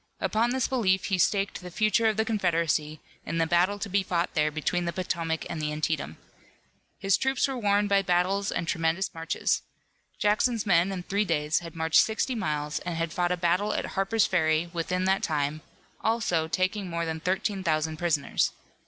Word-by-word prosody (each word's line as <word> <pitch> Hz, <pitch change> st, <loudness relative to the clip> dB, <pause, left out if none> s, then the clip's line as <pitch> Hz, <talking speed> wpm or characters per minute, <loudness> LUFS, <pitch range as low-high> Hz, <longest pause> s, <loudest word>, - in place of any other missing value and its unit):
Upon 225 Hz, +2 st, +1 dB
this 260 Hz, 0 st, 0 dB
belief 195 Hz, -8 st, +1 dB
he 185 Hz, -, +2 dB
staked 200 Hz, +2 st, +1 dB
the 180 Hz, -, -8 dB
future 215 Hz, +5 st, +2 dB
of 215 Hz, -1 st, +1 dB
the 220 Hz, -, +2 dB
Confederacy 165 Hz, -7 st, 0 dB, 0.2 s
in 165 Hz, -, -3 dB
the 165 Hz, -, +2 dB
battle 180 Hz, +4 st, +2 dB
to 205 Hz, -, -4 dB
be 200 Hz, +1 st, +1 dB
fought 175 Hz, -2 st, -1 dB
there 155 Hz, -1 st, +2 dB
between 160 Hz, +3 st, -1 dB
the 170 Hz, -, -1 dB
Potomac 165 Hz, -2 st, -2 dB
and 160 Hz, -, -4 dB
the 150 Hz, 0 st, -1 dB
Antietam. 150 Hz, -, -2 dB, 0.8 s
His 195 Hz, -1 st, +2 dB
troops 265 Hz, +1 st, +1 dB
were 270 Hz, -, -3 dB
worn 205 Hz, -1 st, +2 dB
by 200 Hz, -1 st, +3 dB
battles 190 Hz, +2 st, +1 dB
and 170 Hz, -, -2 dB
tremendous 165 Hz, +3 st, 0 dB
marches. 165 Hz, 0 st, -1 dB, 0.6 s
Jackson's 215 Hz, +2 st, +1 dB
men 180 Hz, -1 st, +3 dB
in 185 Hz, -2 st, -4 dB
three 200 Hz, +3 st, 0 dB
days 155 Hz, -5 st, 0 dB
had 170 Hz, -2 st, -10 dB
marched 160 Hz, 0 st, +4 dB
sixty 220 Hz, +4 st, -1 dB
miles, 150 Hz, -7 st, -2 dB
and 175 Hz, -1 st, -4 dB
had 165 Hz, 0 st, -2 dB
fought 175 Hz, 0 st, 0 dB
a 180 Hz, -, +1 dB
battle 180 Hz, +5 st, +1 dB
at -, -, -1 dB
Harper's 205 Hz, +2 st, +1 dB
Ferry 160 Hz, -1 st, +1 dB
within 180 Hz, +2 st, -1 dB
that 190 Hz, +1 st, +2 dB
time, 150 Hz, 0 st, -1 dB, 0.4 s
also, 215 Hz, -8 st, +1 dB
taking 185 Hz, +3 st, -1 dB
more 170 Hz, 0 st, -2 dB
than 160 Hz, 0 st, -3 dB
thirteen 190 Hz, +3 st, -1 dB
thousand 155 Hz, -1 st, 0 dB
prisoners. 160 Hz, -4 st, 0 dB
180 Hz, 190 wpm, -27 LUFS, 160-200 Hz, 0.8 s, marched